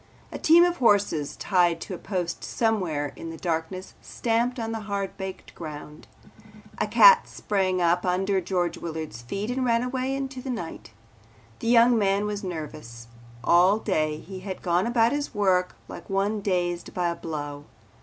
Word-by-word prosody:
A - - -6
team 335 +2 +6
of 350 0 +1
horses 205 - +2
tied 175 -3 +2
to - - -6
a 180 - -6
post 180 -4 -3
somewhere 175 - -1
in 165 - -7
the 165 - -7
darkness 170 +2 -3
stamped 235 +2 -1
on 225 -1 -3
the 225 - -3
hard 200 -1 -2
baked 190 -1 -7
ground. 150 -2 -9 0.7
A - - +1
cat 485 -2 +7
sprang 190 -3 -1
from 175 0 +3
under 190 +2 +1
George 175 -1 -1
Willard's 160 -8 -6
feet 195 - -4
and 260 +1 -1
ran 235 -1 +2
away 260 +1 -2
into 270 -1 -4
the 265 - -7
night. 220 - -5 0.7
The - - -4
young 235 0 +5
man 200 0 +2
was 205 0 -3
nervous. 150 -9 -7 0.3
All 180 +4 +5
day 155 -8 0
he 190 +4 -9
had 190 0 -7
gone 175 +3 +1
about 235 -1 +3
his 290 0 -3
work 185 -3 +2
like - - -10
one 200 +2 0
dazed 175 -3 -2
by 175 -1 +1
a 170 - -2
blow. 145 -3 -6
190 Hz, 170 wpm, -26 LUFS, 170-225 Hz, 0.7 s, cat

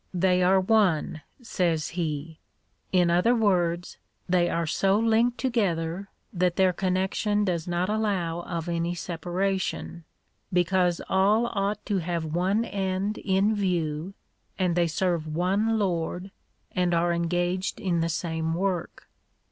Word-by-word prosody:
They 180 0 +3
are 190 +2 +4
one, 185 -6 +2 0.2
says 170 -8 0
he; 160 -2 -4 0.5
in 180 -2 +3
other 180 +8 +3
words, 180 -6 +1 0.3
they 175 -1 +2
are 170 0 0
so 195 +5 +2
linked 230 +2 +2
together, 195 -7 -1 0.2
that 180 -1 +1
their 190 -1 +3
connection 190 +3 0
does 175 -4 -1
not 175 +1 0
allow 195 -6 -1
of 170 -1 -5
any 170 0 -1
separation, 175 +1 -3 0.5
because 180 -1 +2
all 205 +5 +3
ought 200 0 -1
to 200 -3 0
have 170 -1 -2
one 185 +8 0
end 195 0 -2
in 195 +2 +2
view, 175 -2 -1 0.4
and 180 -3 +1
they 175 -1 +3
serve 170 -1 -1
one 195 +8 +1
Lord, 180 -1 -2 0.4
and 180 -1 +1
are 170 +1 +2
engaged 175 +2 -1
in 175 -3 0
the 165 - 0
same 160 0 -2
work. 185 -1 -3
180 Hz, 130 wpm, -26 LUFS, 170-195 Hz, 0.5 s, are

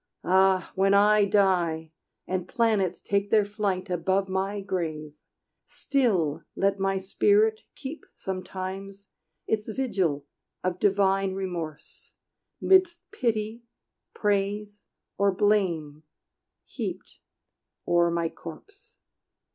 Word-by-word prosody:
Ah, 190 0 +3
when 195 +1 +3
I 210 +1 +5
die, 180 -6 +1 0.3
and 185 -1 -3
planets 215 -7 +1
take 200 0 0
their 215 -2 +4
flight 200 -2 -2
Above 190 +2 0
my 195 +2 -1
grave, 160 -6 -3 0.5
still 190 - 0
let 195 0 +1
my 195 0 +1
spirit 210 +3 +2
keep 290 +4 -8
Sometimes 190 +1 -6 0.4
its 215 0 -1
vigil 190 - -1 0.4
of 180 0 -1
divine 195 -1 +2
remorse, 175 -5 -6 0.5
'Midst 370 -2 +4
pity, 220 -1 -1 0.5
praise, 205 0 -1 0.3
or 200 0 +4
blame 185 -7 +1 0.6
heaped - - -6 0.7
o'er 170 0 +4
my 170 0 0
corse! 280 - -12
195 Hz, 100 wpm, -27 LUFS, 185-210 Hz, 0.7 s, I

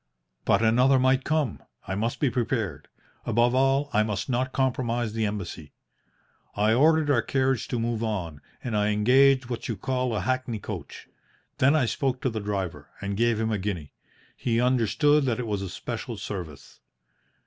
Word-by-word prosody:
"But 100 +3 +3
another 125 +4 +4
might 130 +1 +3
come. 155 -7 -1 0.3
I 95 - -2
must 110 +4 -2
be 140 -4 +2
prepared. 110 - -2 0.4
Above 120 +2 +2
all, 135 +2 +2
I 105 - +4
must 105 0 -2
not 130 +1 0
compromise 120 -4 -1
the 110 -1 0
Embassy. 85 -7 -6 0.8
I 105 +2 +3
ordered 155 +3 +4
our 120 -4 +3
carriage 130 0 0
to 120 - -2
move 115 -1 -1
on, 90 -10 -3 0.2
and 120 -4 -3
I 105 0 +2
engaged 130 +5 +4
what 120 -1 -5
you 115 - -3
call 125 +2 -1
a - - -1
hackney 130 -3 -1
coach. 100 - -8 0.5
Then 140 +4 +5
I 150 -5 +3
spoke 130 +2 -1
to 130 - 0
the 110 - -3
driver, 95 -8 -4
and 100 0 -3
gave 115 +1 +2
him 110 0 0
a 105 - 0
guinea. 90 -7 -4 0.4
He 115 -1 0
understood 130 +4 +3
that 125 -2 0
it 125 - -2
was 105 -3 -2
a 95 - -4
special - - -5
service. 80 -8 -7
115 Hz, 175 wpm, -26 LUFS, 105-130 Hz, 0.8 s, Then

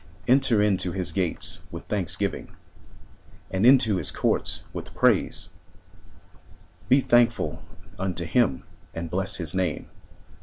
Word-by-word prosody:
Enter 130 -4 +4
into 95 -4 0
his 90 0 -2
gates 90 -4 -2
with - - -8
thanksgiving. 95 -2 -2 1.0
And 95 +5 +2
into 115 -6 +5
his - - -1
courts - - -1
with - - -8
praise; - - +2 1.4
Be 135 +2 +5
thankful 120 -2 +2 0.4
unto 90 -3 -2
him 95 - +1 0.3
and 80 -1 -5
bless 95 +2 0
his 85 -5 -3
name. 90 -5 -2
95 Hz, 115 wpm, -25 LUFS, 90-115 Hz, 1.4 s, into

